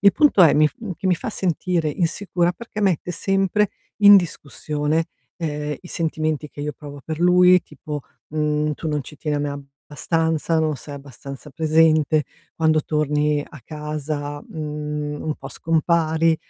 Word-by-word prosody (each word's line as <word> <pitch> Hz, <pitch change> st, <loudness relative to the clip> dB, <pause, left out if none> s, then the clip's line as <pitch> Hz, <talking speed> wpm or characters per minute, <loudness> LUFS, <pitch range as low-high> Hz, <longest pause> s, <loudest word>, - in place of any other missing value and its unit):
Il 200 Hz, -1 st, +6 dB
punto 290 Hz, -10 st, +5 dB
è: 165 Hz, -, +7 dB
mi 155 Hz, 0 st, +5 dB
f -, -, -22 dB
mhmm, 220 Hz, -5 st, -5 dB
che 190 Hz, -, -3 dB
mi 180 Hz, -, +4 dB
fa 220 Hz, -, -5 dB
sentire 175 Hz, -3 st, 0 dB
insicura, 175 Hz, +2 st, 0 dB
perché 215 Hz, +1 st, -6 dB
mette 180 Hz, -2 st, +1 dB
sempre 195 Hz, +2 st, +1 dB, 0.3 s
in 205 Hz, 0 st, +10 dB
discussione, 155 Hz, -1 st, -2 dB, 0.3 s
ehm, 150 Hz, -3 st, -3 dB
i 180 Hz, -, -13 dB
sentimenti 155 Hz, -2 st, -2 dB
che 145 Hz, -, -9 dB
io 150 Hz, 0 st, -3 dB
provo 145 Hz, -1 st, -10 dB
per 160 Hz, +2 st, -5 dB
lui, 180 Hz, +1 st, +6 dB
tipo, 150 Hz, -3 st, -7 dB, 0.3 s
mhmm: 150 Hz, 0 st, 0 dB
"Tu 160 Hz, -, -6 dB
non 150 Hz, -2 st, -1 dB
ci 150 Hz, -, -12 dB
tieni 145 Hz, -1 st, -1 dB, 0.4 s
abbastanza, 160 Hz, +1 st, 0 dB
non 155 Hz, -2 st, +1 dB
sei 145 Hz, +1 st, -9 dB
abbastanza 140 Hz, +1 st, -10 dB
presente, 155 Hz, 0 st, +3 dB, 0.3 s
quando 160 Hz, -1 st, +3 dB
torni 150 Hz, -1 st, 0 dB
a 145 Hz, -, -13 dB
casa, 150 Hz, -1 st, -4 dB
mhmm, 150 Hz, -1 st, -4 dB
un 155 Hz, -, -2 dB
po' -, -, -9 dB
scompari". 165 Hz, 0 st, +1 dB
155 Hz, 155 wpm, -22 LUFS, 150-170 Hz, 0.4 s, in